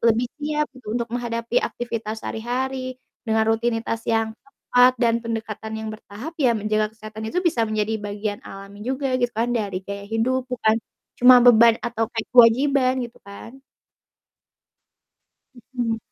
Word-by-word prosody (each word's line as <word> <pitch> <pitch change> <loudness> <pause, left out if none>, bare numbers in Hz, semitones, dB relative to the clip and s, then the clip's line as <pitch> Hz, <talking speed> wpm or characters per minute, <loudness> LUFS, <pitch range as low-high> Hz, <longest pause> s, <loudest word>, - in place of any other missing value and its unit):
lebih 230 +1 +3
siap 300 0 0
gitu, 240 -3 -5
untuk 235 -1 -2
menghadapi 235 0 -1
aktivitas 225 -2 -4
sehari-hari 255 +3 -3 0.3
dengan 220 0 +3
rutinitas 225 0 0
yang 225 -1 +1
tepat 250 -2 +2
dan 235 -1 +2
pendekatan 220 -1 -5
yang 220 0 -5
bertahap, 215 +7 -9
ya 240 -5 +3
menjaga 215 0 0
kesehatan 220 0 -7
itu 355 - -1
bisa 235 -10 +1
menjadi 215 0 -1
bagian 205 0 -4
alami 200 +1 -11
juga 260 +4 -2
gitu 245 - +2
kan, 235 +2 0
dari 200 -5 -2
gaya 200 0 -7
hidup 250 +4 0
bukan 225 -3 +1 0.4
cuma 250 +1 +9
beban 235 -1 +7
atau 225 -2 -1
kayak 225 -2 -5
kewajiban, 255 +2 +5
gitu 235 - -12
kan 230 +6 -12 2.1
Mhm. 235 -3 -1
230 Hz, 140 wpm, -23 LUFS, 220-250 Hz, 2.1 s, cuma